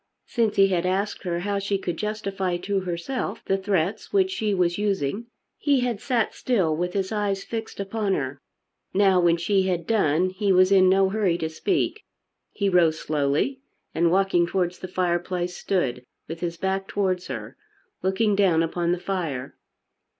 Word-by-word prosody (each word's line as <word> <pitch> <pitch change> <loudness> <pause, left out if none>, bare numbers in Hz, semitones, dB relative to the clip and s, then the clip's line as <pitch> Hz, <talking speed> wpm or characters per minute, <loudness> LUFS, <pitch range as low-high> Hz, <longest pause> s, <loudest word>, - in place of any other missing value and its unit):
Since 225 -4 0
he 195 0 +5
had 180 -1 0
asked 195 +3 -1
her 175 -1 -1
how 200 +1 -1
she 200 0 -1
could 175 -3 -3
justify 195 -3 -2
to 195 +2 -1
herself 190 +6 -4
the 195 - +2
threats 195 0 -1
which 380 -2 +3
she 215 - -1
was 180 -1 +1
using 205 +1 -1 0.3
he 280 -3 +2
had 240 -4 -1
sat 240 -4 0
still 190 -11 +1
with 180 +2 -2
his 195 0 -1
eyes 205 -2 -1
fixed 225 -3 -6
upon 200 0 -1
her. 135 0 -4 0.5
Now, 195 -2 +5
when 170 -1 +4
she 190 +2 +1
had 175 -3 -1
done, 185 -4 +2
he 200 +1 0
was 185 +1 +5
in 185 -1 +6
no 190 0 +4
hurry 195 -4 +1
to 160 -2 -2
speak. 340 - -1 0.5
He 200 - -1
rose 170 -4 +4
slowly 150 - 0 0.3
and 170 +1 +2
walking 185 -1 +3
towards 180 0 -1
the 185 - -6
fireplace 180 0 -1
stood 130 -10 -1 0.2
with 165 +1 -6
his 170 -1 -3
back 190 +2 -1
towards 185 -3 -1
her, - - -6 0.5
looking 200 +2 +1
down 180 -5 +3
upon 170 +1 0
the 175 - -2
fire. 165 -9 -3
190 Hz, 170 wpm, -25 LUFS, 175-205 Hz, 0.5 s, in